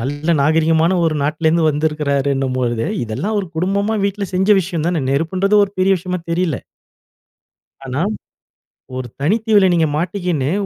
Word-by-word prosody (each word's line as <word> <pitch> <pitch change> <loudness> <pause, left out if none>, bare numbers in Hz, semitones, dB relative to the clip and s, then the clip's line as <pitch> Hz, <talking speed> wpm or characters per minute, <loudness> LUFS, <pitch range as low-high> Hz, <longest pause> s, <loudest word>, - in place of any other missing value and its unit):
நல்ல 145 +7 -1
நாகரீகமான 160 +3 +2
ஒரு 155 -2 +1
நாட்ல 155 +2 0
இருந்து 160 -1 +3
வந்திருக்கிறாருன்னும்பொழுது, 140 -5 -1 0.2
இதெல்லாம் 200 - -2
ஒரு 190 - -7
குடும்பமா 200 +5 0
வீட்டுல 200 0 -3
செஞ்ச 190 +3 +1
விஷயம் 170 -3 -3
தான? 170 -4 -1
நெருப்புன்றது 185 +8 +1
ஒரு 200 - -11
பெரிய 195 +1 +4
விஷயமா 180 0 -4
தெரியல. 170 -3 0 1.3
ஆனா, 130 +3 -2 1.0
ஒரு 130 - -4
தனி 165 +10 +2
தீவுல 205 -4 +5
நீங்க 165 -2 +2
மாட்டிக்கின்னு, 170 -4 -1
165 Hz, 135 wpm, -18 LUFS, 145-185 Hz, 1.3 s, தீவுல